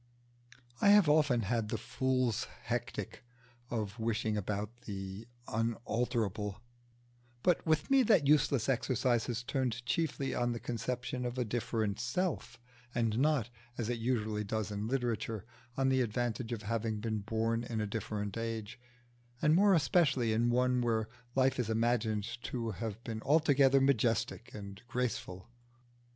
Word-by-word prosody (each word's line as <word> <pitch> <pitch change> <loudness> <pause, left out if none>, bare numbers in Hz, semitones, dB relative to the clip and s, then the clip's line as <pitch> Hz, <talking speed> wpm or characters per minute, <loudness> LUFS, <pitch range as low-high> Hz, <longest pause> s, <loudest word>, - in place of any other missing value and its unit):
I - - +6
have 205 -4 +7
often 145 -5 +4
had 110 +1 -1
the - - -1
fool's 130 -3 0 0.2
hectic 120 0 -4 0.5
of 110 -2 -3
wishing 110 -1 0
about 105 +2 -3
the 95 +1 -6 0.2
unalterable, 115 -3 -1 0.8
but 180 -2 +3
with 155 - +1
me 270 -1 +7
that 210 - +4
useless 140 -4 +3
exercise 125 -2 +1
has 120 0 -2
turned 125 -2 -2
chiefly 140 0 -1
on 120 0 0
the 115 - -4
conception 125 +2 -3
of 125 +1 -3
a 125 - 0
different 110 -2 -1
self, 125 -1 -2 0.4
and 115 -1 +1
not, 140 -5 +2 0.3
as 115 -1 -2
it 120 -1 -1
usually 110 -3 0
does 110 0 -2
in 105 +1 -3
literature, 115 -4 -2 0.3
on 135 0 +3
the 130 0 +3
advantage 120 0 -1
of 110 -3 -3
having 110 0 -1
been 110 0 -2
born 115 +2 -1
in 115 -2 -3
a 105 - 0
different 105 -1 -3
age, 115 0 -4 0.6
and 150 - +4
more 195 +3 +6
especially 135 -8 +3
in 115 +2 +2
one 125 +1 +2
where 110 -2 0 0.3
life 130 0 +3
is 120 -3 0
imagined 110 -2 +1 0.2
to 115 -3 -2
have 110 +3 -5
been 110 -2 -5
altogether 140 -2 +4
majestic 115 -3 +1
and 100 -2 -8
graceful. 115 -7 -3
120 Hz, 145 wpm, -33 LUFS, 110-130 Hz, 0.8 s, have